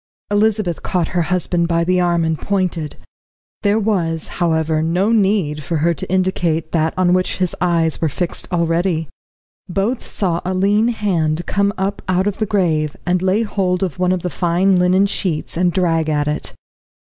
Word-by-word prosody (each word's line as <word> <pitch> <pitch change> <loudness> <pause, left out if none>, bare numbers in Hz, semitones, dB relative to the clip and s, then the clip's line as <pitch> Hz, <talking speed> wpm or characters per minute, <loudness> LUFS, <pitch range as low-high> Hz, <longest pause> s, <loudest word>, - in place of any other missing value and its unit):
Elizabeth 205 -4 +1
caught 180 -3 -1
her 175 - 0
husband 175 0 0
by 170 0 +1
the 180 +1 +2
arm 170 -1 +1
and 160 -1 -1
pointed. 180 -6 -2 0.7
There 205 0 +2
was, 180 -7 0
however, 160 -2 +1
no 175 +7 +1
need 195 -9 +1
for 160 +3 -2
her 170 +3 +2
to 155 - -7
indicate 175 -4 0
that 160 -1 0
on 180 -1 +3
which 185 0 0
his 185 -2 -1
eyes 165 -3 +1
were 160 - +2
fixed 175 +6 -4
already. 170 -2 0 0.6
Both 205 +7 -1
saw 175 -4 -1
a 185 +1 -2
lean 205 +4 +2
hand 175 -8 0
come 200 0 +1
up 195 +2 -2
out 185 0 +1
of 205 -1 -2
the 215 - 0
grave, 160 -7 0
and 180 +1 +1
lay 190 +4 +2
hold 190 -4 -1
of 180 -3 -3
one 180 0 +2
of 185 -2 -1
the 180 - -2
fine 180 +2 +2
linen 185 +2 +4
sheets 180 -5 -2
and 175 +1 +2
drag 165 -3 +1
at 150 -1 0
it. 150 0 -2
180 Hz, 180 wpm, -18 LUFS, 165-195 Hz, 0.7 s, linen